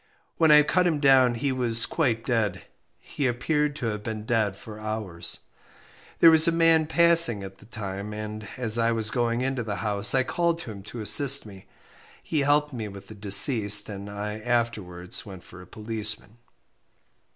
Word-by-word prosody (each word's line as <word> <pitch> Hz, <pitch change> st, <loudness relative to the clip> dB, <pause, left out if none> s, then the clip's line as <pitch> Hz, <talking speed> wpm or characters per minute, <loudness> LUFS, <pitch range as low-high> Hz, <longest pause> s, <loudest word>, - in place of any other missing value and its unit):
When 160 Hz, -1 st, +2 dB
I 150 Hz, 0 st, +6 dB
cut 180 Hz, +4 st, 0 dB
him 160 Hz, -4 st, -1 dB
down 130 Hz, -3 st, +3 dB
he 135 Hz, +4 st, -3 dB
was 120 Hz, -3 st, +4 dB
quite 115 Hz, -8 st, -2 dB
dead; 115 Hz, -4 st, -2 dB, 0.3 s
he 140 Hz, -, -5 dB
appeared 150 Hz, +4 st, -2 dB
to 140 Hz, -, -6 dB
have 105 Hz, -2 st, -4 dB
been 110 Hz, 0 st, -7 dB
dead 110 Hz, -4 st, -1 dB
for 110 Hz, 0 st, -12 dB
hours. 100 Hz, -6 st, -5 dB, 0.8 s
There 165 Hz, -, +6 dB
was 160 Hz, 0 st, +6 dB
a -, -, +3 dB
man 165 Hz, -1 st, +2 dB
passing 170 Hz, -10 st, +5 dB
at 95 Hz, 0 st, -11 dB
the 105 Hz, -, -19 dB
time, 100 Hz, -2 st, -7 dB
and, 105 Hz, 0 st, -8 dB
as 120 Hz, -2 st, 0 dB
I 115 Hz, 0 st, +1 dB
was 110 Hz, -2 st, -1 dB
going 120 Hz, 0 st, -2 dB
into 135 Hz, -1 st, -3 dB
the 110 Hz, -3 st, -5 dB
house, 100 Hz, +2 st, +2 dB
I 130 Hz, -, +2 dB
called 170 Hz, +4 st, -2 dB
to 120 Hz, -, -8 dB
him 100 Hz, -2 st, -11 dB
to 120 Hz, -, -8 dB
assist 135 Hz, +7 st, +2 dB
me. 95 Hz, -3 st, -14 dB, 0.6 s
He 155 Hz, -, -3 dB
helped 145 Hz, +1 st, 0 dB
me 110 Hz, -4 st, -6 dB
with 100 Hz, -1 st, -13 dB
the -, -, -10 dB
deceased, 105 Hz, 0 st, +5 dB
and 100 Hz, 0 st, -9 dB
I 105 Hz, +1 st, -6 dB
afterwards 110 Hz, -7 st, -4 dB
went 95 Hz, -3 st, -12 dB
for 90 Hz, -, -15 dB
a 90 Hz, -, -16 dB
policeman. 110 Hz, +1 st, -6 dB
115 Hz, 185 wpm, -24 LUFS, 105-135 Hz, 0.8 s, I